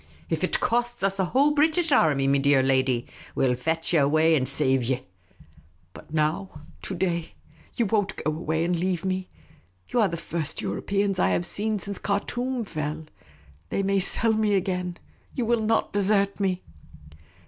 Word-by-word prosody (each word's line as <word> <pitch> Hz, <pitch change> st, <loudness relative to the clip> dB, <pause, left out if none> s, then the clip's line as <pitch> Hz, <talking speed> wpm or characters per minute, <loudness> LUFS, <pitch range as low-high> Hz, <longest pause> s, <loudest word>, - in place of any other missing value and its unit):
" -, -, -28 dB
If -, -, -1 dB
it -, -, +1 dB
costs 240 Hz, -2 st, -1 dB
us 195 Hz, 0 st, 0 dB
a 190 Hz, -, +2 dB
whole 275 Hz, +10 st, +3 dB
British 315 Hz, +2 st, +2 dB
army, 145 Hz, -, +3 dB
me 140 Hz, 0 st, +3 dB
dear 140 Hz, -1 st, +3 dB
lady, 130 Hz, -2 st, +1 dB, 0.3 s
we -, -, +2 dB
'11 125 Hz, -1 st, 0 dB
fetch 165 Hz, +1 st, 0 dB
you 165 Hz, -, +5 dB
away 155 Hz, +3 st, +3 dB
and 130 Hz, -4 st, +2 dB
save 135 Hz, -2 st, +2 dB
you." 130 Hz, +1 st, -1 dB, 0.5 s
" 80 Hz, +3 st, -30 dB
But 155 Hz, -, -14 dB
now 150 Hz, -12 st, -1 dB
— 75 Hz, -, -27 dB
to -, -, -4 dB
day? 170 Hz, -2 st, -2 dB, 0.4 s
You 235 Hz, -, +1 dB
won't 205 Hz, -1 st, 0 dB
go 155 Hz, -, -2 dB
away 160 Hz, +1 st, -2 dB
and 175 Hz, +1 st, 0 dB
leave 180 Hz, 0 st, -1 dB
me? 185 Hz, 0 st, -2 dB, 0.6 s
You -, -, 0 dB
are 210 Hz, -, +4 dB
the 170 Hz, -2 st, -4 dB
first 165 Hz, -2 st, -4 dB
Europeans 200 Hz, -1 st, -1 dB
I -, -, +3 dB
have 175 Hz, -, 0 dB
seen 210 Hz, +4 st, 0 dB
since 200 Hz, 0 st, -5 dB
Khartoum 240 Hz, +5 st, -2 dB
fell. 155 Hz, -4 st, -4 dB, 0.6 s
They 195 Hz, -, -1 dB
may 195 Hz, 0 st, +2 dB
sell 220 Hz, +4 st, +4 dB
me 215 Hz, -2 st, +2 dB
again. 180 Hz, -2 st, -2 dB, 0.4 s
You 245 Hz, -, -1 dB
will 235 Hz, 0 st, +1 dB
not 220 Hz, +1 st, 0 dB
desert 200 Hz, 0 st, +1 dB
me 185 Hz, -2 st, -1 dB
180 Hz, 185 wpm, -25 LUFS, 150-205 Hz, 0.6 s, you